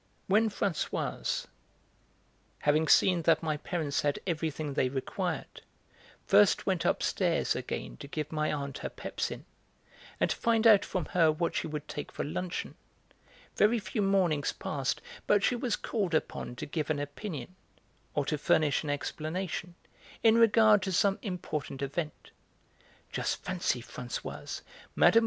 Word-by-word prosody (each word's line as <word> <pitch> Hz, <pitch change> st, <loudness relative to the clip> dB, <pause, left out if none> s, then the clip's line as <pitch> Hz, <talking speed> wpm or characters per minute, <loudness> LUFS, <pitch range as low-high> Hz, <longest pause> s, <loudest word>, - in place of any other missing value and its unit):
When 215 Hz, +3 st, +3 dB
Françoise, 195 Hz, -5 st, -2 dB, 1.1 s
having 155 Hz, +2 st, +2 dB
seen 180 Hz, +1 st, +5 dB
that 165 Hz, 0 st, +3 dB
my 155 Hz, -2 st, 0 dB
parents 155 Hz, -3 st, -1 dB
had 145 Hz, -1 st, +1 dB
everything 155 Hz, -4 st, -2 dB
they 130 Hz, -, +2 dB
required, 130 Hz, 0 st, -3 dB, 0.6 s
first -, -, +5 dB
went -, -, 0 dB
upstairs -, -, +1 dB
again -, -, -4 dB
to -, -, -9 dB
give 150 Hz, +1 st, -4 dB
my 155 Hz, -1 st, 0 dB
aunt 140 Hz, -2 st, -4 dB
her -, -, -4 dB
pepsin -, -, -4 dB, 0.7 s
and -, -, +3 dB
to -, -, 0 dB
find 230 Hz, -1 st, +2 dB
out 215 Hz, -3 st, +8 dB
from 185 Hz, -4 st, -2 dB
her 165 Hz, -3 st, +5 dB
what 165 Hz, +2 st, -1 dB
she -, -, -1 dB
would 150 Hz, -1 st, -5 dB
take 145 Hz, -, -6 dB
for -, -, -3 dB
luncheon, 175 Hz, +4 st, -3 dB, 0.8 s
very 215 Hz, +3 st, +4 dB
few 215 Hz, +1 st, -2 dB
mornings 185 Hz, -7 st, +2 dB
pased 140 Hz, -3 st, -2 dB, 0.3 s
but 205 Hz, -1 st, +4 dB
she 245 Hz, -, +3 dB
was 240 Hz, -2 st, 0 dB
called 195 Hz, -8 st, -1 dB
upon 125 Hz, -, -2 dB
to -, -, -5 dB
give 150 Hz, 0 st, -3 dB
an 155 Hz, -, +1 dB
opinion, 145 Hz, -, -5 dB, 0.6 s
or 145 Hz, -, +1 dB
to 150 Hz, 0 st, -1 dB
furnish 150 Hz, 0 st, +3 dB
an 150 Hz, -, -5 dB
explanation, 170 Hz, +4 st, -3 dB, 0.5 s
in 225 Hz, 0 st, +6 dB
regard 220 Hz, -2 st, +6 dB
to 190 Hz, 0 st, -2 dB
some 195 Hz, +3 st, +2 dB
important 155 Hz, -, -4 dB
event. 150 Hz, +3 st, -4 dB, 0.8 s
"Just -, -, -2 dB
fancy, 175 Hz, -9 st, -1 dB
Françoise, 125 Hz, 0 st, -6 dB, 0.3 s
Mme. 230 Hz, -, +6 dB
160 Hz, 145 wpm, -30 LUFS, 145-195 Hz, 1.1 s, out